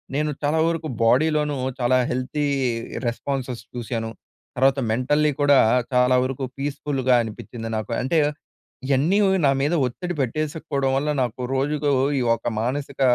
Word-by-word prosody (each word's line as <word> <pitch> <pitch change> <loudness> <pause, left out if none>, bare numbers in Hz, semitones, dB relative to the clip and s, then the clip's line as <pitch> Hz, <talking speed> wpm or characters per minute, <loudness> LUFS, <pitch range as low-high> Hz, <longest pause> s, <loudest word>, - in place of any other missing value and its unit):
నేను 150 +1 0
చాలా 150 +2 +1
వరకు 165 -1 -2 0.2
బోడీలోను, 150 +4 +2 0.2
చాలా 125 +1 +3
హెల్తీ 130 +4 -2 0.6
రెస్పాన్సెస్ 125 0 -3
చూశాను. 115 -1 -3 0.5
తర్వాత 135 +2 +3
మెంటల్లీ 145 +6 +2
కూడా, 145 -1 +5 0.3
చాలా 125 0 +4
వరకు 135 +1 -3
పీస్‍ఫులుగా 135 -2 0
అనిపించింది 115 +1 -7
నాకు. 110 +1 -5
అంటే, 145 +6 +1 0.7
ఇయన్నీ 145 +8 +2 0.3
నా 135 - +5
మీద 145 +4 +1
ఒత్తిడి 175 +8 -5
పెట్టేసుకోడం 140 0 -1
వల్ల, 145 +2 -1
నాకు 125 +1 -4
రోజుకు, 145 +2 0 0.3
ఈ - - 0
ఒక 115 - -7
మానసిక 135 +3 -3
135 Hz, 130 wpm, -23 LUFS, 125-150 Hz, 0.7 s, కూడా